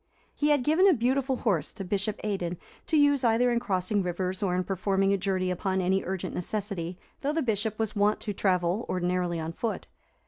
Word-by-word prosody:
He 295 - +1
had 290 -4 +3
given 325 +8 +5
a 360 - +5
beautiful 260 +2 +1
horse 185 - 0
to 195 - -6
Bishop 200 +2 -1
Aidan, 180 -4 -2 0.3
to 315 - +2
use 285 -2 +4
either 240 +1 +3
in 235 - +2
crossing 200 -2 0
rivers, 185 +2 -2
or 185 -3 +1
in 185 - +1
performing 195 +1 +1
a - - +4
journey 185 -1 0
upon 190 +1 -1
any 190 +1 +1
urgent 190 0 -4
necessity, 185 -2 -3 0.2
though 290 +2 0
the 320 -1 0
Bishop 215 -2 -1
was 220 -1 -2
wont 205 +1 +2
to 210 - -3
travel 185 +2 +1
ordinarily 180 -1 0
on 160 +1 -4
foot. 225 +5 -3
195 Hz, 200 wpm, -28 LUFS, 180-230 Hz, 0.3 s, given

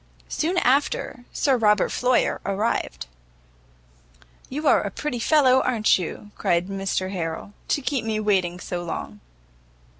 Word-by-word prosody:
Soon 345 +4 -1
after, 265 -3 +1
Sir 270 -4 +2
Robert 210 -3 +3
Floyer 250 0 +1
arrived. 205 +4 -1 1.4
"You 300 +4 -3
are - - +5
a - - -3
pretty 300 -5 -4
fellow, 260 -1 +4
a'n't 225 -6 +3
you," 185 +4 -6
cried 175 +2 +1
Mr 195 -1 -2
Harrel, 170 +1 -4
"to 285 - 0
keep 265 -4 -1
me 220 -1 -1
waiting 185 -4 +1
so 175 -1 -4
long." 135 -10 -6
215 Hz, 130 wpm, -24 LUFS, 185-260 Hz, 1.4 s, are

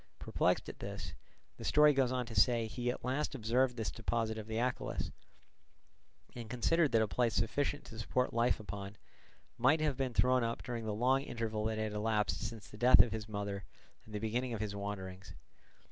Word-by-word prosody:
Perplexed - - 0
at - - -8
this, - - -6 0.4
the - - -8
story 150 0 +5
goes 135 -2 +2
on 125 -1 -1
to 115 - -9
say, 115 +2 +3
he 120 +2 -3
at 125 - -4
last 135 +3 -1
observed 125 +1 +1
this 110 -3 -2
deposit 115 -1 -1
of 110 -1 -7
the 110 0 -3
Achelous, 125 +1 -2 1.2
and 115 -2 -7
considered 145 +6 +2
that 115 -1 +5
a - - 0
place 115 +1 +1
sufficient 145 0 0
to 115 - -10
support 125 +3 0
life 115 +1 +2
upon, 100 0 -7 0.6
might 130 +7 +4
have 150 -4 0
been 130 -3 -2
thrown 125 -1 +4
up 115 0 -2
during 120 -2 -4
the 110 - -1
long 130 +4 +3
interval 115 -5 -3
that 110 0 -1
had 110 -1 -2
elapsed 105 0 0
since 110 -2 -6
the 105 - -12
death 125 +3 +8
of 120 - -5
his 110 -1 -5
mother 100 -1 -4 0.4
and 110 - -10
the - - -1
beginning 120 +3 -1
of - - -5
his 105 -1 -3
wanderings. 95 -2 -6
115 Hz, 195 wpm, -34 LUFS, 110-125 Hz, 1.2 s, death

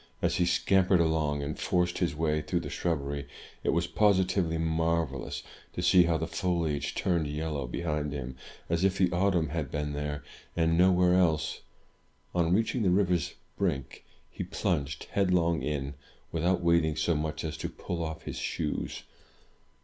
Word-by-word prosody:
As - - +1
he 90 - +2
scamp 95 +1 +3
ered 95 - +5
along, 80 -3 +1
and 75 +2 -4
forced 90 -1 +1
his 85 -3 0
way 75 -1 +1
through 80 +4 -1
the 75 - -6
shrubbery, 70 -4 -2 0.4
it - - 0
was 85 +1 +2
positively 95 -3 +2
marvellous 80 -4 -1 0.3
to 90 - -3
see 90 0 +6
how 85 -1 +2
the 80 - -2
foliage 85 -4 -1
turned 85 -4 +1
yellow 75 -2 -3
behind 75 +1 -2
him, 65 -3 -5 0.3
as 85 +2 0
if 95 0 +2
the 90 -2 +3
autumn 90 -3 +2
had 75 -4 -2
been 75 0 -2
there, 75 0 -3 0.3
and 80 -1 +2
nowhere 90 0 +5
else. 80 -3 +2 0.7
On 85 -1 +2
reaching 110 +5 +2
the 95 - +3
river's 90 -3 +2 0.2
brink, 80 -10 -2 0.3
he - - -4
plunged 85 -6 -2
headlong 90 -5 +2
in, 70 0 -2 0.4
without 85 +3 +1
wait 85 -1 +4
ing 80 -1 0
so 80 +2 +1
much 75 0 -2
as 80 0 -3
to - - -3
pull 85 -1 -4
off 80 0 -5
his - - -5
shoes. 75 -2 -3
80 Hz, 165 wpm, -29 LUFS, 75-90 Hz, 0.7 s, see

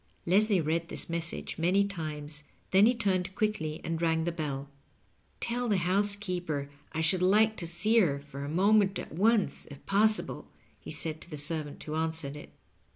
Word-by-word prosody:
Leslie 200 +2 +3
read 165 +2 -1
this - - -4
message 170 0 -3
many 185 +4 +3
times, 155 -5 -6 0.3
then 195 +3 +6
he 245 - +3
turned 195 -4 -1
quickly 160 -8 -1
and 165 0 -3
rang 160 -1 +1
the 170 - -1
beU. 145 -5 -4 0.7
"Tell 245 +1 -2
the 205 - +3
housekeeper 180 -6 0 0.2
I 160 - -2
should 180 +3 +2
like 215 +4 +4
to 170 - -3
see 215 +7 +2
her 145 -9 +2
for 140 -1 -9
a 140 - -4
moment 195 +3 +3
at - - -7
once, 200 -2 +1
if 140 -1 -12
possible," 215 +2 +1 0.3
he - - -11
said 160 -1 -2
to - - -8
the 150 - -6
servant 145 0 -1
who 155 - -6
answered 160 -2 -1
it. 150 - -10
170 Hz, 175 wpm, -29 LUFS, 155-200 Hz, 0.7 s, then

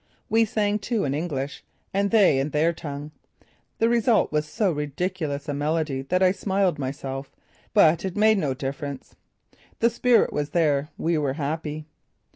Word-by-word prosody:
We 225 0 +4
sang, 210 -1 0
too, 215 +1 -1
in 140 - -1
English, 145 -3 -3 0.3
and 200 +1 +1
they 200 -11 +5
in 135 +2 -1
their 155 +3 +2
tongue. 145 -2 -7 0.7
The 225 - +3
result 235 -1 +3
was 150 0 0
so 200 +4 0
ridiculous 150 0 -3
a 145 - -2
medley 150 -1 -1
that 180 +3 +2
I 185 - +5
smiled 190 -4 0
myself; 135 0 -5 0.4
but 165 -5 +5
it 190 0 -4
made 215 0 +4
no 140 -6 -1
difference. 140 +1 -6 0.6
The 235 +1 +3
spirit 240 +1 +3
was 145 0 -2
there; 150 -4 +1
we 165 -1 0
were 140 -3 0
happy. 155 +1 -4
155 Hz, 160 wpm, -25 LUFS, 145-195 Hz, 0.7 s, they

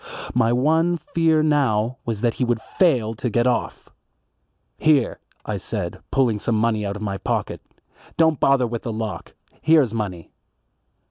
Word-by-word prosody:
My 115 - +2
one 160 +7 +2
fear 160 0 +1
now 130 -5 +1
was 110 -3 -3
that 120 -2 +1
he 130 - -2
would 120 -2 0
fail 125 - +1
to 120 +3 -3
get 120 +2 +1
off. 125 -1 -1 0.9
"Here," 145 -6 +2 0.3
I - - -3
said, - - -4
pulling 120 -6 +1
some 115 +2 -1
money 110 -1 +1
out 100 0 -3
of 105 - -6
my 100 -2 -3
pocket, - - -2 0.6
"don't 160 -3 +3
bother 135 -2 +3
with 115 -1 -4
the 115 - -4
lock. 110 -2 -5 0.3
Here's 150 -8 +4
money." 95 -7 -4
120 Hz, 155 wpm, -22 LUFS, 110-150 Hz, 0.9 s, Here's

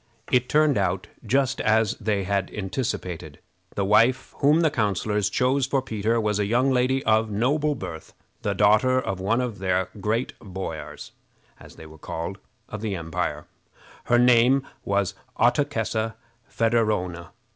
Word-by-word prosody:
It 125 0 +2
turned 150 -5 +3
out 95 +1 -1 0.2
just 135 +3 +1
as 110 -1 +2
they 100 -2 0
had 100 0 -1
anticipated. 95 -4 -4 0.4
The 100 - 0
wife 115 +6 +3
whom 150 +4 +4
the 160 -3 +3
councilors 105 -3 0
chose 130 +5 +1
for 135 +1 +1
Peter 115 -2 -1
was 105 -2 0
a 105 - 0
young 125 +5 +2
lady 130 +1 +1
of 110 0 +3
noble 145 +8 +1
birth, 80 -10 -8 0.3
the 100 -1 -1
daughter 110 +6 +4
of 100 -7 -3
one 110 +6 +1
of 120 -5 -4
the 95 -1 0
great 110 +5 -1
boiars, 90 -7 -7 0.5
as - - -14
they 80 - -12
were 80 0 -14
called, 85 +6 -5 0.3
of 105 - -7
the 105 -3 -2
empire. 80 -3 -3 0.6
Her 120 - +3
name 125 +2 +4 0.2
was 100 -2 0 0.3
Ottokessa 115 -4 +1 0.3
Federowna. 105 -7 0
110 Hz, 145 wpm, -24 LUFS, 95-125 Hz, 0.6 s, whom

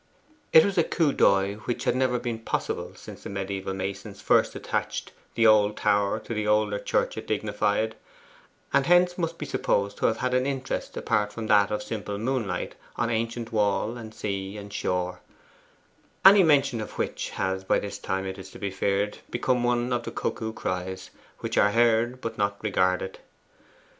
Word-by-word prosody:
It 160 - +8
was 195 -3 +1
a - - +5
coup 155 -4 +1
d'oeil 100 +1 +3
which 120 - -2
had - - +1
never 130 -1 +2
been 120 -2 -3
possible 115 - -3
since - - -11
the - - -7
mediaeval 95 -1 -3
masons 95 +1 -5
first - - +3
attached - - -3 0.2
the 115 - +3
old 105 -1 +5
tower 100 +1 +2
to 115 - -6
the 105 -1 -2
older 105 -1 +2
church - - 0
it - - -6
dignified, 105 +1 0 0.8
and 140 0 +3
hence 175 0 +5
must 165 -1 -2
be 150 - -5
supposed 100 -7 0
to - - +2
have 110 - 0
had 125 +1 -1
an 130 +1 +2
interest 135 -1 -3
apart 105 -1 0
from 110 +1 -5
that 105 -2 +4
of 105 0 -2
simple 105 -2 -4
moonlight 120 -1 -2 0.2
on 120 -1 0
ancient 115 +1 -2
wall 105 +1 +1
and 110 -2 -9
sea 100 0 -4
and 100 0 -9
shore 90 -2 -2 1.1
any 195 +1 +10
mention 140 -8 +3
of 105 - -7
which - - -3
has 95 0 -2
by - - +2
this 100 - -5
time, 95 0 -2
it 95 0 -5
is 95 0 -9
to - - -12
be 100 -1 -3
feared, 100 +2 -1
become 125 +1 0
one 120 0 +1
of 120 - 0
the - - -6
cuckoo 110 -1 -3
cries 95 -3 -4 0.3
which - - 0
are 100 0 +4
heard 120 +1 +3
but 115 -1 -5
not 100 0 0
regarded. 95 -2 0
110 Hz, 185 wpm, -26 LUFS, 100-120 Hz, 1.1 s, any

